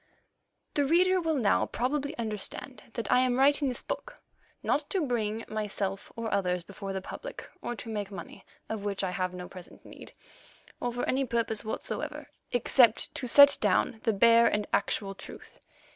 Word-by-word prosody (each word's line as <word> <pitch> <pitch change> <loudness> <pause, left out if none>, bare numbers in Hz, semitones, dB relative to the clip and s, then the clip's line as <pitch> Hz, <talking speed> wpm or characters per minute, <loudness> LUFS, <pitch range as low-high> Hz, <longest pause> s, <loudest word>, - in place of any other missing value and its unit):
The 290 - +2
reader 365 +5 +4
will 325 -2 0
now 220 -6 +2
probably 285 +4 -2
understand 230 +3 -4
that 230 -4 -2
I - - +6
am 255 -1 +2
writing 280 +1 +4
this 250 - -5
book, - - -6 0.4
not 290 0 0
to 370 -6 0
bring 225 -3 -1
myself 205 -2 -3
or 230 -1 -3
others 180 -2 0
before 195 +1 -7
the 190 -1 -4
public, - - -8
or 240 - -3
to 235 - -9
make 210 -3 -3
money 195 - -9 0.2
of 220 -2 -4
which 200 -1 -2
I 185 - 0
have 185 0 -1
no 180 0 -7
present 180 -2 -12
need, - - -11 0.7
or 245 - -1
for 245 +1 -2
any 270 +1 +1
purpose 230 -3 -1
whatsoever, 295 +6 -4 0.2
except 240 -1 +3
to 255 - -4
set 285 +3 +8
down 225 - +2
the 225 - +2
bare 230 +3 +6
and 210 0 0
actual 195 -2 0
truth. - - -12
230 Hz, 175 wpm, -29 LUFS, 200-270 Hz, 0.7 s, set